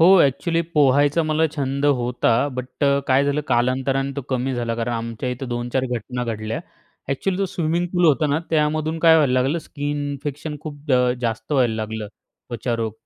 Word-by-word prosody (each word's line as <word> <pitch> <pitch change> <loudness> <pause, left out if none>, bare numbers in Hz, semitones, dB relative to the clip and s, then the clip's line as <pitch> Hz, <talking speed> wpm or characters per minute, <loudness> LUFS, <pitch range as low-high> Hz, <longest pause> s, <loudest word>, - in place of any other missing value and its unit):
हो, 180 +4 +8
अ‍ॅक्चुअली 165 +5 +2
पोहायचा 145 +2 +4
मला 155 +1 +2
छंद 140 0 -1
होता. 125 -3 +1 0.2
बट 125 +3 -4
अ, 140 0 +4
काय 135 +2 +4
झालं 145 +1 +1
कालांतराने 130 +3 +1
तो - - -1
कमी 130 +1 0
झाला 120 -1 -2
कारण 115 +1 -2
आमच्या 115 +1 -3
इथं 125 +1 -5
2-4 120 +2 -1
घटना 125 +1 -3
घडल्या. 110 -1 -3 0.5
अ‍ॅक्चुअली 180 +7 -1
जो 195 - +1
स्विमिंग 170 0 -1
पूल 175 -1 +2
होता 155 -1 +4
ना, 145 +1 +1
त्यामधून 155 +1 +1
काय 165 0 +6
व्हायला 145 -5 +3
लागलं 130 +5 +2
स्कीन 145 -2 -4
इन्फेक्शन 145 +2 -5
खूप 150 -1 -8
अ, 125 -1 +4
जास्त 115 +1 -3
व्हायला 125 -5 +3
लागलं, 110 0 -4 0.4
त्वचा 120 0 -2
रोग. 115 -2 -2
135 Hz, 180 wpm, -22 LUFS, 120-150 Hz, 0.5 s, हो